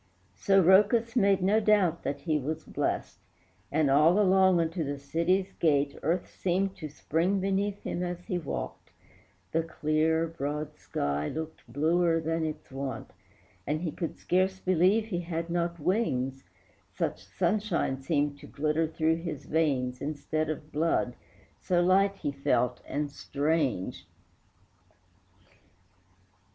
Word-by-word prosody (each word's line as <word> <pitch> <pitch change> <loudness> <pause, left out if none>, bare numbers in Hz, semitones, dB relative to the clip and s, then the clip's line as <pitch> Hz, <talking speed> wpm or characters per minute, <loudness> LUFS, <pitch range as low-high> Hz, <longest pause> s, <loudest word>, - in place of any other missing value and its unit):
So 195 - +3
Rhœcus 210 +6 +4
made 195 -5 +3
no 205 +4 +4
doubt 205 -6 +3
that 140 - -3
he 155 -3 0
was 155 +3 -4
blest, - - -3 0.5
And 155 0 +2
all 155 +7 +5
along 190 -2 +5
unto 165 +1 -1
the 145 -1 -3
city's 170 +7 0
gate 145 -3 +2
Earth 170 +3 0
seemed 190 +2 -1
to 155 - -6
spring 170 +6 0
beneath 195 +1 -1
him 175 - -3
as 175 -1 -3
he 180 -5 -2
walked, 155 - -5 0.6
The 165 - +2
clear, 160 0 +1
broad 150 -2 -4
sky 70 +1 -2
looked 160 -6 -7
bluer 165 +4 +2
than 165 0 -1
its 155 -3 -5
wont, 135 -3 -5 0.6
And 155 +2 -1
he 170 -3 -2
could 165 0 -5
scarce 190 +1 +1
believe 185 +5 +3
he 190 -6 -3
had 170 0 -4
not 170 0 -1
wings 135 - -1 0.5
Such - - -2
sunshine 190 -10 -1
seemed 145 -1 0
to - - -12
glitter 155 +2 0
through 160 0 +1
his 165 -4 -6
veins 135 -6 0
Instead 155 +1 -2
of 155 0 -5
blood, 145 -6 0 0.4
so 180 -1 +1
light 195 +3 +4
he 145 - -3
felt 125 -3 0
and 145 +1 -2
strange. 140 - -1
165 Hz, 135 wpm, -29 LUFS, 145-185 Hz, 0.6 s, all